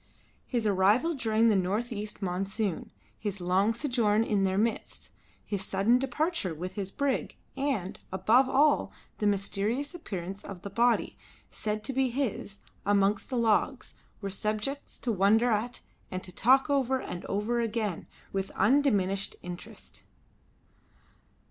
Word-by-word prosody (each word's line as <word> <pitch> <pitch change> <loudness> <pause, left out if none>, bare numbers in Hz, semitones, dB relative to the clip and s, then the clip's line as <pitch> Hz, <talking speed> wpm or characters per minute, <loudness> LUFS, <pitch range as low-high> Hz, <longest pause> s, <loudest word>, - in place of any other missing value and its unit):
His 240 -3 0
arrival 210 - +3
during 230 -4 +2
the 215 - +4
north 200 +6 0
east 210 -1 -5
monsoon, 195 0 -2 0.3
his 205 -2 -3
long 185 +4 +2
sojourn 230 -4 +1
in 210 -3 +1
their 190 0 +1
midst, 225 +2 -2 0.3
his 200 -2 -3
sudden 200 +7 +3
departure 270 - -1
with 180 +4 -5
his 195 -1 -3
brig, 280 +4 -1 0.2
and, 265 -10 -2
above 220 +8 +4
all, 290 +1 +3 0.3
the 210 - +2
mysterious 205 - 0
appearance 195 - -6
of 195 -2 -9
the 200 - -6
body, 235 +3 +2 0.3
said 215 0 -3
to 270 - -3
be 265 0 +2
his, 235 -5 -3 0.2
amongst 200 0 +2
the 255 - -1
logs, 225 -2 +1 0.3
were 200 -1 -3
subjects 215 +8 -2
to 245 - -2
wonder 220 +4 +4
at 230 +3 -1 0.3
and 185 0 -4
to 180 - -8
talk 260 +9 +4
over 265 -2 +2
and 180 -7 -6
over 215 +4 0
again 220 -5 -2 0.3
with 195 0 -1
undiminished 205 -9 +2
interest. 175 0 -8
215 Hz, 140 wpm, -29 LUFS, 195-245 Hz, 0.3 s, the